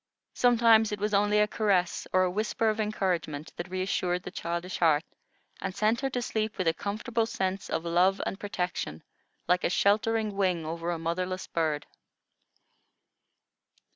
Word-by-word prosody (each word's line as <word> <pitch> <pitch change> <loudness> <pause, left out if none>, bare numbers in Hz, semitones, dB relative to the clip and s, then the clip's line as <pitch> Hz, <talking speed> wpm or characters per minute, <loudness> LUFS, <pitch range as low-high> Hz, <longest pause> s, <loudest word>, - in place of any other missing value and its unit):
Sometimes 230 -3 +5
it 210 - -2
was 210 +1 -1
only 205 +1 +3
a 210 - +4
caress 195 -5 0
or 185 0 +4
a 180 - +1
whisper 215 +3 0
of 215 - -5
encouragement, 180 -8 -2
that 175 +1 -6
re 185 0 -2
assured 180 -1 -1
the - - -7
childish 170 -1 -4
heart, 160 -2 +4 0.6
and 190 -1 -4
sent 220 +4 +1
her 270 - 0
to 245 -2 -2
sleep 220 -2 -2
with 185 - -1
a 165 - +4
comfortable 220 +5 -2
sense 190 -3 -2
of 165 - -2
love 180 +3 +3
and 195 - -4
protection, 180 - -3 0.4
like 180 +1 +2
a - - +2
sheltering 215 +2 +2
wing 180 -5 +1
over 165 +2 -4
a 175 - -1
motherless 180 +3 -2
bird. 155 -3 -1
190 Hz, 165 wpm, -28 LUFS, 175-215 Hz, 0.6 s, Sometimes